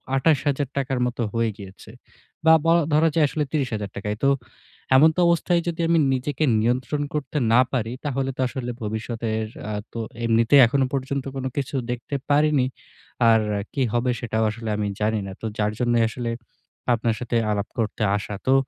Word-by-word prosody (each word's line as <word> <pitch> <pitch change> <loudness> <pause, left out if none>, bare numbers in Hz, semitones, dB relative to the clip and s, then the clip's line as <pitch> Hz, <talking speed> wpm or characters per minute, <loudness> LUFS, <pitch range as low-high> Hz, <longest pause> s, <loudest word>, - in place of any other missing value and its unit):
২৮,০০০ 145 -1 +2
টাকার 135 -2 -1
মতো 120 0 -4
হয়ে 115 -1 +1
গিয়েছে। 100 +1 -11 0.5
বা 160 - +8
বলা 165 0 +4
ধরা 160 +2 +4
যায় 160 - +5
আসলে 150 - -1
৩০,০০০ 115 -9 -2
টাকাই। 105 +1 -3
তো 140 - +5 0.7
এমন 155 +4 +7
তো - - -2
অবস্থায়, 170 +1 +2
যদি 170 0 -3
আমি 165 -1 +4
নিজেকে 130 +3 -2 0.2
নিয়ন্ত্রণ 130 +5 0
করতে 150 0 -3 0.2
না 125 - +7
পারি, 115 -3 -1
তাহলে 135 -1 -1
তো - - -1
আসলে 125 -1 -4
ভবিষ্যতের 110 0 -3 0.3
আ - - -3 0.2
তো 115 - -4 0.3
এমনিতেই 115 +4 +5
এখনো 135 +2 +1
পর্যন্ত 135 0 -2
কোন 130 -1 -4
কিছু 140 0 -2 0.2
দেখতে 125 +4 -4
পারিনি। 145 -2 +3 0.6
আর 110 -1 +5 0.3
কী 135 - +1
হবে 125 +1 +1
সেটাও 110 -1 -1
আসলে 115 0 -6
আমি 105 -1 -1
জানি 110 0 +1
না। - - -6
তো - - -5
যার 105 0 +1
জন্যই 120 -1 +2
আসলে 120 -1 -4 0.6
আপনার 115 -1 0
সাথে 120 -1 -3 0.2
আলাপ 105 0 -1
করতে 110 -1 -2 0.2
আসা। 105 +1 -6
তো 130 - +5
125 Hz, 175 wpm, -23 LUFS, 115-140 Hz, 0.7 s, বা